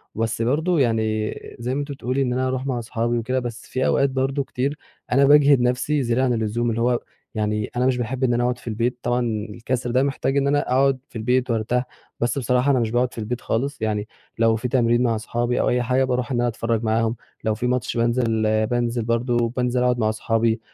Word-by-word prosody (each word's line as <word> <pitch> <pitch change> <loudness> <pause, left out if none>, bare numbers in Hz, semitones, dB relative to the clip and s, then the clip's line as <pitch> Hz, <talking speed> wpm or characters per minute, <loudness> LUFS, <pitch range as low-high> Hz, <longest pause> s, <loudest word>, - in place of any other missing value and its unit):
بس 115 0 -1
برضو 155 +9 +1
يعني 110 -4 +1 0.3
زي 120 +2 -2
ما - - -1
أنتِ 145 0 -4
بتقولي 135 -1 -2
إن 125 -2 0
أنا 130 +1 0
أروح 130 0 -2
مع 130 -3 -1
أصحابي 120 +1 -1
وكده 125 +3 -1
بس 120 -1 -6
في 130 0 -1
أوقات 140 - +3
برضو 135 +1 -1
كتير 135 +3 -2 0.3
أنا 135 +2 +5
باجهد 145 -2 +6
نفسي 125 +4 +1
زيادة 120 +2 +1
عن 125 -2 +2
اللزوم، 115 +1 -1
اللي 115 0 -1
هو 120 0 +2 0.4
يعني 105 -1 -1
أنا 125 +1 +1
مش 130 -1 +2
باحب 125 +2 -3
إن 125 -2 +3
أنا 120 +1 +1
أقعد 125 0 0
في - - -17
البيت، 115 +2 -1
طبعًا 120 0 +1 0.3
الكسر 120 +3 -3
ده 130 +2 +3
محتاج 140 0 -1
إن 140 0 +2
أنا 145 +1 +3
أقعد 135 +1 +3
في - - -24
البيت 125 +3 +1
وأرتاح، 115 +2 0 0.4
بس 120 +4 0
بصراحة 125 +1 +2
أنا 130 - +3
مش 115 -2 -1
باقعد 125 +1 +1
في - - -14
البيت 115 +2 -3
خالص، 140 +4 -2
يعني 105 -1 -1 0.3
لو 115 -1 +4
في 115 +3 -2
تمرين 120 -1 +2
مع 115 -2 +1
صحابي 120 +2 -1
أو - - +2
أي 125 - +2
حاجة 130 +2 +2
باروح 125 0 -1
إن 120 - 0
أنا 120 - +2
أتفرج 115 -1 -1
معاهم، 115 +1 +1 0.3
لو 110 -1 +1
فيه 120 +3 -2
ماتش 125 -2 -1
بانزل 115 -1 +1 0.2
بانزل 120 -1 -1
برضو 120 +1 +1
بانزل 125 +1 0
أقعد 125 -1 +2
مع 110 -1 +2
صحابي، 115 +1 0
120 Hz, 225 wpm, -22 LUFS, 115-130 Hz, 0.4 s, باجهد